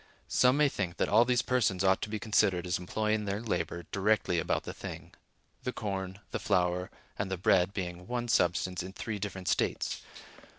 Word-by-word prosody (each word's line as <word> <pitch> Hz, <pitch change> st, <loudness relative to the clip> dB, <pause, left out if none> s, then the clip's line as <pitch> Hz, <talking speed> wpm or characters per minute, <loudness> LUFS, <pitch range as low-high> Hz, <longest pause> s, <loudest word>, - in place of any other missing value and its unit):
Some 125 Hz, +2 st, +4 dB
may 150 Hz, 0 st, +5 dB
think 95 Hz, -9 st, -3 dB
that -, -, +1 dB
all 120 Hz, -, +6 dB
these 120 Hz, -1 st, +2 dB
persons 110 Hz, -7 st, +1 dB
ought 95 Hz, 0 st, +3 dB
to -, -, -3 dB
be 110 Hz, -, -2 dB
considered 100 Hz, -5 st, +2 dB
as 90 Hz, -1 st, 0 dB
employing 105 Hz, +4 st, -1 dB
their 100 Hz, 0 st, -1 dB
labor 105 Hz, -6 st, -2 dB
directly 100 Hz, -3 st, +2 dB
about -, -, 0 dB
the -, -, -6 dB
thing; -, -, -8 dB, 0.5 s
the 125 Hz, -, -2 dB
corn, 95 Hz, -4 st, -4 dB
the -, -, -2 dB
flour, 90 Hz, 0 st, +1 dB, 0.3 s
and 100 Hz, -1 st, -1 dB
the 95 Hz, -, -2 dB
bread 90 Hz, +1 st, +3 dB
being 90 Hz, -2 st, -5 dB
one 120 Hz, -1 st, -2 dB
substance 90 Hz, -4 st, +1 dB
in 95 Hz, +1 st, -7 dB
three 105 Hz, 0 st, -4 dB
different 95 Hz, -2 st, -5 dB
states. -, -, 0 dB
100 Hz, 185 wpm, -31 LUFS, 90-110 Hz, 0.5 s, all